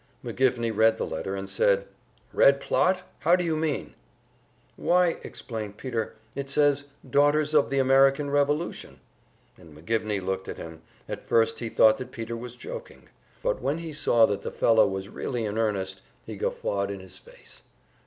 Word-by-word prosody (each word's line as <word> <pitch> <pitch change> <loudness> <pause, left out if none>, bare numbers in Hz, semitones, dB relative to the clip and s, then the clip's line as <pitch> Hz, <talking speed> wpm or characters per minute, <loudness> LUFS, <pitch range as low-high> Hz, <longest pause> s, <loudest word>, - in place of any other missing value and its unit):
McGivney 120 -3 0
read 110 +1 +4
the - - -2
letter, 95 0 -4
and 95 0 -5
said, 100 0 +2 0.5
"Red 140 0 +5
plot? 185 +5 +1 0.2
How 170 +3 +4
do 180 - -1
you 165 -2 0
mean?" 155 -2 -2 0.8
"Why," 175 -1 +2
explained 110 -3 -7
Peter, 115 -3 -3 0.2
"it 140 0 -5
says 145 0 +2 0.2
`Daughters 145 +3 +3
of 150 -2 +4
the 140 - -1
American 135 +2 +4
Revolution.'" 145 +3 -1 0.6
And 80 -3 -15
McGivney 105 +4 -1
looked 95 0 -3
at - - -6
him; 80 -1 -9 0.3
at - - -7
first 115 0 +3
he 115 - -4
thought 110 +1 +5
that 130 - -7
Peter 115 0 -5
was 120 +1 -8
joking, 125 - -9 0.3
but - - 0
when 140 +5 0
he 165 -2 -6
saw 120 -6 +4
that 100 -2 -2
the - - -4
fellow 110 -2 +4
was 95 0 -4
really 120 +2 -3
in 105 +1 -2
earnest, 95 -4 -1 0.2
he - - -7
guffawed 100 0 -2
in 100 -1 -5
his 95 -1 -11
face. - - -14
115 Hz, 170 wpm, -26 LUFS, 100-145 Hz, 0.8 s, Red